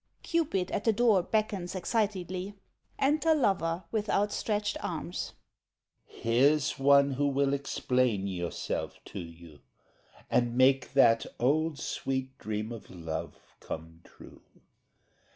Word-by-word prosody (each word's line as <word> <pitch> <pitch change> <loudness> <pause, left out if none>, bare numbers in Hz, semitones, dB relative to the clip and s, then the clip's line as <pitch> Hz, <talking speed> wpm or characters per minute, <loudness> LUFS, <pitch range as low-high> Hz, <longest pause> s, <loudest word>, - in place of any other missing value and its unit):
[CUPID 290 - 0
at 205 - -1
the 225 - +4
door 220 -3 +4
beckons 200 -2 -1
excitedly. 190 -1 -2 0.4
Enter 310 +3 +3
lover 180 - +1
with 215 -2 -1
outstretched 205 0 0
arms.] 170 +1 -4 0.8
CUPID - - -15
Here's 135 +6 +3
one 140 0 +5
who 145 +2 +1
will 140 0 +1
explain 125 -6 0
yourself 90 -3 -3
to 100 - -7
you 85 -3 -11 0.7
And 120 0 +1
make 135 +1 +4
that 115 -4 +5
old 155 +5 +1
sweet 130 -2 -3
dream 105 +1 -3
of 115 -4 -9
love 80 -2 -7
come 80 +1 -8
true. - - -15
140 Hz, 115 wpm, -30 LUFS, -, 0.8 s, one